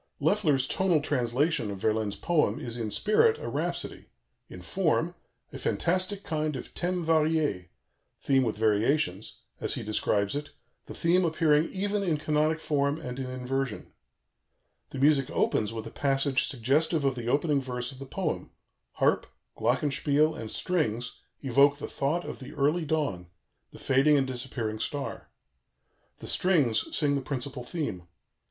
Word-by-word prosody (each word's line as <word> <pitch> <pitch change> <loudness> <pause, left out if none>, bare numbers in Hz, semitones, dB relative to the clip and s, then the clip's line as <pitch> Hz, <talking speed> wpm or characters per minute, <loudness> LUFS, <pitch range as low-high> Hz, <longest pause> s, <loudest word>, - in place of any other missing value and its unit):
" - - -49
Loeffler's 150 -11 +2
tonal 185 -2 +2
translation 140 -1 0
of 100 - -4
Verlaine's 110 0 0
poem 150 -11 +1
is 120 -1 -5
in 115 -3 -3
spirit 325 - +3
a - - -6
rhapsody, - - -3 0.4
in - - -9
form - - 0 0.4
"a - - -6
fantastic 185 +3 0
kind 155 -2 -1
of 125 - -7
thème 180 -1 -2
varié" 155 - +2 0.5
(theme 135 -1 +3
with 115 -4 -1
variations), 110 - +1 0.2
as - - -1
he - - -4
describes 105 -1 0
it, 145 0 -5 0.3
"the - - -8
theme 175 +2 +3
appearing 160 -1 +2
even 205 +2 -1
in 170 -6 +1
canonic 155 +1 +1
form 145 -1 0
and 125 +1 -6
in 130 -1 -4
inversion." 130 -1 -3 1.0
The - - -7
music 135 -1 +3
opens 105 -1 +1
with 115 -1 -5
a 115 - -7
passage 135 0 +1
suggestive 145 +4 +1
of 135 - +3
the 120 -2 -6
opening 145 +2 +2
verse 125 -1 -4
of 130 - -12
the 135 - -8
poem: - - -3 0.4
harp, - - +2 0.3
glockenspiel, 150 +2 +2
and 110 -6 -6
strings 125 -9 -2 0.2
evoke 140 +2 +4
the - - -5
thought 155 +6 -1
of - - -6
the 135 +2 -9
early 150 +4 +1
dawn, 145 - -1 0.4
the - - -13
fading 135 +3 +4
and 135 - +2
disappearing 120 -4 -4
star. 145 +2 -4 0.9
The - - -11
strings 150 -12 +2
sing 145 -3 +2
the 140 - 0
principal 130 -1 -4
theme. 120 - -4
140 Hz, 155 wpm, -28 LUFS, 125-155 Hz, 1.0 s, evoke